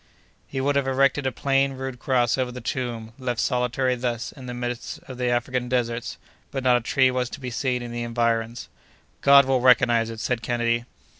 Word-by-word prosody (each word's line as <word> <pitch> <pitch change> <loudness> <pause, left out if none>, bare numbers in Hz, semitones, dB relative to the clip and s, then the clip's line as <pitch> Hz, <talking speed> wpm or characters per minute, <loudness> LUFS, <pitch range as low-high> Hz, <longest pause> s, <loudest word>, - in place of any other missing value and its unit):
He 135 - -4
would 140 +2 +1
have 140 -1 0
erected 135 +1 +2
a - - 0
plain, 135 +2 +1
rude 130 -1 -6
cross 125 -3 +2
over 130 -2 -1
the 125 - -7
tomb, 120 -2 -4
left 125 -3 -2
solitary 125 +1 +1
thus 120 -1 -3
in 130 -3 -11
the 125 - -5
midst 120 -1 -4
of 130 -2 -10
the 125 - 0
African 125 +1 -1
deserts, 120 -2 -1 0.3
but 135 -2 -4
not 125 -1 +5
a - - -3
tree 130 +2 +3
was 125 -1 -1
to - - -8
be 125 -2 -5
seen 125 +1 -1
in 120 - -7
the 120 0 -4
environs. 115 0 -1 0.5
"God 140 0 +7
will 130 -1 +1
recognize 120 -2 +4
it!" 115 -1 -7
said 120 +1 -1
Kennedy. 120 0 0
125 Hz, 205 wpm, -24 LUFS, 120-130 Hz, 0.5 s, God